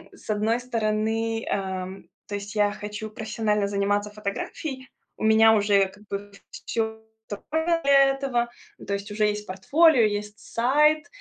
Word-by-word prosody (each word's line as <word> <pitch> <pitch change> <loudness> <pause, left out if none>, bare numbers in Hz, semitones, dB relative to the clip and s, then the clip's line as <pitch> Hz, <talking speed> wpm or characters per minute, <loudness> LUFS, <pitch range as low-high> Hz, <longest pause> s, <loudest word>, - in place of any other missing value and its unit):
М, - - -20
с - - -11
одной 220 +3 +1
стороны, 225 -1 -1
эм, 190 -1 -4 0.2
то 205 - -6
есть 205 +1 -7
я 205 -1 +2
хочу 210 +1 -6
профессионально 215 -2 -1
заниматься 205 +1 0
фотографией. 255 +6 -5 0.3
У - - -4
меня 220 0 +6
уже, 200 -2 +3
как 205 +2 -17
бы, 200 +1 -5 0.2
всё 220 -1 -3 0.3
готово 315 +10 -3 0.2
для 275 -1 +6
этого. 255 -3 -1 0.4
То 200 - -1
есть 200 +1 -5
уже 210 +1 0
есть 210 0 -2
портфолио, 275 - +4
есть 210 0 -1
сайт. 300 +5 +2
215 Hz, 150 wpm, -25 LUFS, 205-230 Hz, 0.4 s, меня